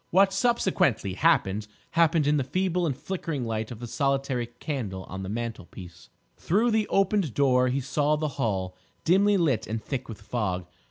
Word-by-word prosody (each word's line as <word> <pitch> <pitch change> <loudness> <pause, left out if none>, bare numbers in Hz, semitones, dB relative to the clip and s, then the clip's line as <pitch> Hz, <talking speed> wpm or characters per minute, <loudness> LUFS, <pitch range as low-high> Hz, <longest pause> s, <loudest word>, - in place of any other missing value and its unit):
What 195 +2 +4
subsequently 190 - +1
happened, 105 - +2 0.2
happened 165 -2 +3
in 150 +1 +3
the 140 - +1
feeble 180 +4 0
and 135 -4 -2
flickering 165 -7 -4
light 110 -1 -3
of 120 - -8
the 120 - -6
solitary 135 -1 -1
candle 120 - -5
on 95 +1 -7
the 95 - -5
mantlepiece. 100 -6 -7 0.3
Through 220 +7 +2
the 220 -1 +1
opened 195 - +1
door 130 -2 +4
he 130 +2 0
saw 145 +3 +1
the 155 0 -1
hall, 95 -6 -1 0.3
dimly 200 +4 +4
lit 155 - +1
and 110 +1 -2
thick 130 +3 -5
with 110 - -7
fog. 100 -4 -2
135 Hz, 170 wpm, -27 LUFS, 110-170 Hz, 0.3 s, What